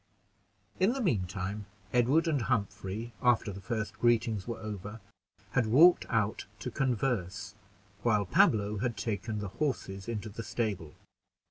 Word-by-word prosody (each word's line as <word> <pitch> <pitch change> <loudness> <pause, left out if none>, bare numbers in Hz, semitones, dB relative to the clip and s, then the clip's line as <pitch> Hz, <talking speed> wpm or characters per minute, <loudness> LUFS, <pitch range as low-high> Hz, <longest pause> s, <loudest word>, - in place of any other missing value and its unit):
In 190 +6 +4
the 270 - -3
mean 105 - +1
time, 100 +2 -4 0.3
Edward 135 +8 +4
and 150 -5 +1
Humphrey, 110 -1 -2
after 120 -4 +3
the 100 - -8
first 110 -1 -3
greetings 115 -4 +2
were 115 -1 -3
over, 105 0 -6 0.5
had 120 -3 +2
walked 160 +10 +6
out 110 -3 0
to 125 - -4
converse, 105 -6 -1 0.5
while 105 -3 +2
Pablo 105 +2 +3
had 120 0 -1
taken 110 0 -2
the 105 -1 -3
horses 100 -7 -3
into 110 -1 -3
the 110 +3 -6
stable. 105 -10 -3
110 Hz, 140 wpm, -31 LUFS, 100-120 Hz, 0.5 s, walked